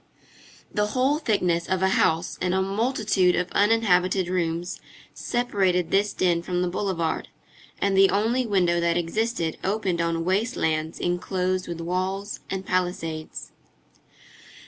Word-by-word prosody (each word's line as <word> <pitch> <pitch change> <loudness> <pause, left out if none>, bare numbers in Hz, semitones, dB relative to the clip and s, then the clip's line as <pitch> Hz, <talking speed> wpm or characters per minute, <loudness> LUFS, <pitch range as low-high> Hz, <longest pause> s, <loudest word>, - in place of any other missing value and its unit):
The 210 0 +1
whole 275 +4 +2
thickness 180 - 0
of 185 0 0
a 190 - +4
house 165 -2 +1
and 180 0 +1
a 190 - +2
multitude 200 -3 +1
of 180 0 -1
uninhabited 190 -4 +2
rooms 175 -1 -2 0.3
separated 195 -8 0
this 205 +1 +2
den 175 -2 +1
from 180 +1 -1
the - - 0
boulevard, 175 -3 -2 0.5
and 200 -1 +1
the 195 0 +6
only 230 +5 +1
window 180 -4 +2
that 170 0 +1
existed 175 0 -1
opened 190 -3 0
on 165 0 -1
waste 210 +7 0
lands 160 0 -1
enclosed 185 +1 -1
with 170 -1 -5
walls 185 +4 -2
and 190 0 -4
palisades. 175 -4 -3
185 Hz, 135 wpm, -25 LUFS, 175-200 Hz, 0.5 s, the